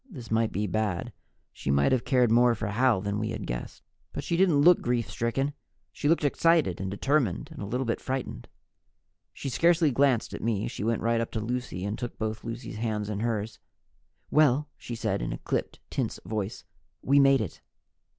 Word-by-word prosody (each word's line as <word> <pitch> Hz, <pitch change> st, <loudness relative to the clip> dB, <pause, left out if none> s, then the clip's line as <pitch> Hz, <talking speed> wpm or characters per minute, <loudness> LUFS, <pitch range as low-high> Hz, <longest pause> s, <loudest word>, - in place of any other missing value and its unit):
This 125 Hz, -, -10 dB
might 110 Hz, 0 st, +2 dB
be 105 Hz, +3 st, -1 dB
bad. 105 Hz, -3 st, -2 dB, 0.4 s
She -, -, -5 dB
might 70 Hz, +1 st, +3 dB
have 130 Hz, -3 st, +1 dB
cared 125 Hz, -4 st, +3 dB
more 120 Hz, 0 st, +5 dB
for 110 Hz, -, -4 dB
Hal 115 Hz, -1 st, +2 dB
than 100 Hz, +1 st, -2 dB
we 110 Hz, 0 st, -2 dB
had 110 Hz, -, -4 dB
guessed. -, -, -6 dB, 0.3 s
But -, -, -4 dB
she 170 Hz, -, -1 dB
didn't 170 Hz, -5 st, +4 dB
look 175 Hz, +2 st, +6 dB
grief 120 Hz, -2 st, 0 dB
stricken. 135 Hz, +5 st, -1 dB, 0.4 s
She 145 Hz, -, -1 dB
looked 165 Hz, -1 st, +3 dB
excited, 150 Hz, -, +2 dB
and 95 Hz, -, -2 dB
determined, 105 Hz, -, 0 dB
and -, -, -9 dB
a 100 Hz, -, -4 dB
little 125 Hz, +5 st, -1 dB
bit 115 Hz, -, -1 dB
frightened. 130 Hz, -, -4 dB, 0.8 s
She -, -, -7 dB
scarcely 165 Hz, +3 st, +3 dB
glanced 130 Hz, -2 st, +2 dB
at -, -, -6 dB
me. 110 Hz, -2 st, 0 dB
She -, -, -5 dB
went 115 Hz, 0 st, 0 dB
right 115 Hz, 0 st, +2 dB
up 115 Hz, -, -3 dB
to 110 Hz, -, -1 dB
Lucy 110 Hz, -5 st, -3 dB
and 105 Hz, +2 st, -3 dB
took 120 Hz, -1 st, -5 dB
both 110 Hz, 0 st, -3 dB
Lucy's 115 Hz, -1 st, -6 dB
hands 110 Hz, -2 st, -2 dB
in 100 Hz, -, -3 dB
hers. 110 Hz, -1 st, -2 dB, 0.7 s
"Well," 150 Hz, -1 st, +4 dB
she 120 Hz, -, -7 dB
said 110 Hz, -4 st, -1 dB
in -, -, -2 dB
a -, -, -3 dB
clipped, -, -, -3 dB
tense -, -, -2 dB
voice, 110 Hz, -1 st, -3 dB, 0.4 s
"we 140 Hz, +1 st, +4 dB
made 135 Hz, -1 st, +6 dB
it." 100 Hz, -7 st, -5 dB
115 Hz, 200 wpm, -28 LUFS, 105-135 Hz, 0.8 s, look